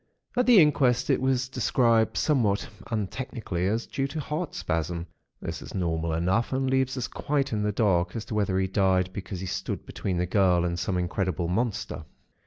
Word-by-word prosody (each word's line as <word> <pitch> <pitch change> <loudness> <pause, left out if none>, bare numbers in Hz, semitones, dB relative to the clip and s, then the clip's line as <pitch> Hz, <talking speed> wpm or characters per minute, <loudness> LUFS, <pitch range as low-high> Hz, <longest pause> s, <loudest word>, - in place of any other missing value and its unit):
At 250 0 +2
the 240 -5 +8
inquest 140 -6 +3
it - - +2
was 130 -1 +1
described 115 -1 +2
somewhat 115 -10 +2 0.2
untechnically 110 -4 -3
as 115 +3 -1
due 135 0 -2
to 150 +3 -5
heart 150 +3 -3
spasm. 85 +1 -2 0.4
That - - -4
is - - -9
normal 85 -3 -1
enough, 90 +8 +1
and 135 0 0
leaves 130 0 +1
us 125 - -2
quite 140 -3 -1
in 105 - 0
the 105 0 +1
dark 90 -4 +1
as 110 -1 -4
to 120 - -6
whether 100 -3 +1
he 95 - +2
died 95 -1 +1
because 95 -1 -6
he - - -4
stood 90 - -4
between 95 -2 -3
the 90 - +1
girl 90 -2 +3
and 85 0 -2
some 90 +1 -1
incredible 90 -1 -1
monster. 100 -5 -2
105 Hz, 190 wpm, -27 LUFS, 90-130 Hz, 0.4 s, the